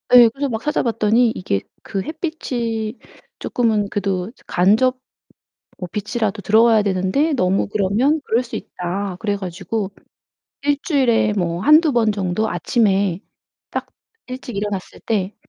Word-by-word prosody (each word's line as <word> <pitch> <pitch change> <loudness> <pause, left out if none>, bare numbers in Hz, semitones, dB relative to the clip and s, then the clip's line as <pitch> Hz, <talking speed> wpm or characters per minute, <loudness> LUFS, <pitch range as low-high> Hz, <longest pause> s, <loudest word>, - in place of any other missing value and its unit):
예, 240 -2 +9
그래서 275 +4 -3
막 220 -2 -3
찾아봤더니 230 -4 +2
이게 100 - -1 0.2
그 195 - -3
햇빛이 250 - -3 0.4
조금은 215 -4 0
그래도 195 0 -2 0.2
간접 220 +8 +3 0.8
뭐 180 -2 -5
빛이라도 210 0 -2
들어와야 220 +1 +5
되는데 195 - +1
너무 195 -7 +1
그러면 215 +10 +1
그럴 235 +3 +1
수 235 - -8
있다. 185 +2 -4
그래 205 -2 -1
가지고 195 +2 -4 0.7
1 290 0 +2
주일에 250 - +2
뭐 170 -2 -1
1-2 305 - +5
번 225 -3 +3
정도 200 +2 -1
아침에 200 -6 +1 0.5
딱 - - -3 0.4
일찍 255 -3 -7
일어났을 200 -2 -4
때 205 -3 -1
215 Hz, 265 characters per minute, -20 LUFS, 195-245 Hz, 0.8 s, 예